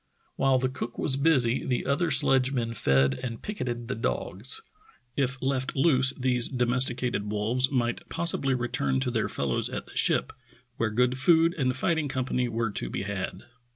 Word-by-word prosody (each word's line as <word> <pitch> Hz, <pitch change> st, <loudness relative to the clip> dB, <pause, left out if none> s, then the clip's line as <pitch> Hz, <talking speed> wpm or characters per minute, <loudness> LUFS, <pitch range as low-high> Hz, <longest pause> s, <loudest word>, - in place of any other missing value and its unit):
While 135 Hz, -1 st, +3 dB
the 130 Hz, 0 st, 0 dB
cook 130 Hz, -, -6 dB
was 135 Hz, -, +1 dB
busy 135 Hz, -5 st, +2 dB
the 125 Hz, -, -1 dB
other 155 Hz, +5 st, +1 dB
sledgemen 130 Hz, -4 st, +2 dB
fed 65 Hz, -, +2 dB
and 115 Hz, -2 st, -5 dB
picketed 120 Hz, -, -5 dB
the 125 Hz, -, -2 dB
dogs. 440 Hz, -, -3 dB, 0.5 s
If 135 Hz, -1 st, -1 dB
left 130 Hz, -1 st, -1 dB
loose 135 Hz, -3 st, +4 dB
these 125 Hz, -2 st, +2 dB
domesticated 125 Hz, -3 st, +1 dB
wolves 115 Hz, +5 st, +1 dB
might 120 Hz, -3 st, -2 dB
possibly 160 Hz, -5 st, 0 dB
return 130 Hz, +2 st, -1 dB
to 125 Hz, -2 st, -1 dB
their 110 Hz, -2 st, -1 dB
fellows 65 Hz, -3 st, -1 dB
at -, -, -5 dB
the -, -, -16 dB
ship, -, -, +2 dB, 0.4 s
where 115 Hz, -, 0 dB
good 125 Hz, +3 st, +1 dB
food 165 Hz, +4 st, +4 dB
and 130 Hz, -4 st, 0 dB
fighting 160 Hz, 0 st, 0 dB
company 130 Hz, -2 st, -1 dB
were 115 Hz, -1 st, -1 dB
to -, -, -4 dB
be 95 Hz, -, -4 dB
had. 100 Hz, -1 st, -5 dB
130 Hz, 165 wpm, -27 LUFS, 120-135 Hz, 0.5 s, loose